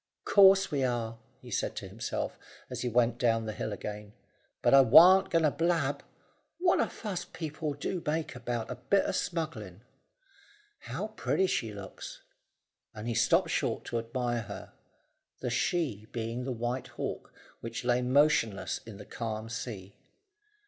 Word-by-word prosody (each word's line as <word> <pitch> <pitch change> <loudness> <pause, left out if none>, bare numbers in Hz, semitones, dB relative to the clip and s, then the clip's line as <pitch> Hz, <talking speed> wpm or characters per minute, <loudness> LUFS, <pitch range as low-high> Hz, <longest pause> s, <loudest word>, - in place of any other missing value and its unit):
"Course 195 -1 +6
we 140 -2 0
are," 115 -2 -2 0.2
he - - -10
said - - -1
to - - -5
himself, - - -4 0.4
as - - -4
he 125 - -1
went 120 0 +2
down 115 -2 +2
the 110 - -3
hill 110 - -4
again. 105 0 -6 0.5
"But - - +4
I 135 - +10
warn't 180 +10 +8
going 165 -1 +2
to 150 - +4
blab. 160 -4 0 0.6
What 355 0 +3
a - - +2
fuss 190 -6 -5
people 155 -2 -5
do 170 +5 -3
make 155 +1 -1
about 120 -1 -3
a 125 - -5
bit 195 +10 +2
o' - - 0
smuggling! 110 - -3 1.0
How - - -5
pretty 190 - 0
she 115 - -1
looks!" 100 -2 -9 0.7
and 110 +2 -6
he 120 - 0
stopped - - +3
short - - -1
to 120 - -2
admire 120 +1 -2
her 105 - -9 0.7
the - - -3
she 130 - -1
being 115 +1 -3
the 135 - -2
White 120 +2 -3
Hawk, - - -5 0.3
which 115 +1 -6
lay 125 0 +3
motionless 125 -6 +2
on 110 -3 -9
the 105 - -10
calm 110 -1 -5
sea. 105 -5 -6
125 Hz, 160 wpm, -30 LUFS, 115-155 Hz, 1.0 s, I